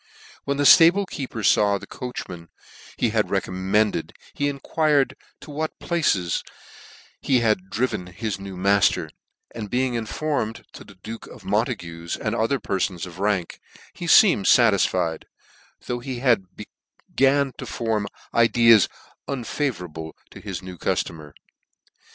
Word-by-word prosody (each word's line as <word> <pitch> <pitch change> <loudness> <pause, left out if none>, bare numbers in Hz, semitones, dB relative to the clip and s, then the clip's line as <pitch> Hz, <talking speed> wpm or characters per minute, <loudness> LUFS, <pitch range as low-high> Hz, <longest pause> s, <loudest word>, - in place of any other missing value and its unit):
When 140 0 -1
the 145 - +1
ftable 175 +6 +7
keeper 125 -9 -6
faw 100 0 +4
the - - -10
coachman, 90 -9 -7 0.5
he - - +1
had - - +1
recommended, 95 +3 0 0.2
he 145 0 0
enquired 145 0 +1 0.3
to 150 - -11
what 155 +2 -4
places 105 - 0 0.8
he 130 -3 +2
had 105 -5 0
driven 105 -6 -2
his 100 +2 -4
new 95 -1 -8
mailer; 100 +1 +2 0.4
and 110 -3 -6
being 125 +2 0
informed, 115 0 -3
to - - -10
the 100 - -16
duke 110 +5 -9
of - - -14
Montague's, 85 0 -2
and - - -2
other 120 +5 0
perfons 95 -3 -2
of 90 0 -11
rank, 100 -4 -1 0.3
he 175 - -7
feemed 165 - +6
fatisfied; 95 -8 +3 0.6
though 120 0 -3
he 125 0 -5
had 120 -6 +2 0.7
begun 135 0 +3
to - - -6
form 110 -3 -2 0.3
ideas 115 -2 +5 0.4
unfavourable 95 - -4 0.2
to - - -11
his 95 -4 -6
new 90 -2 -9
cuftomer. 75 -3 -3
110 Hz, 135 wpm, -23 LUFS, 95-135 Hz, 0.8 s, ftable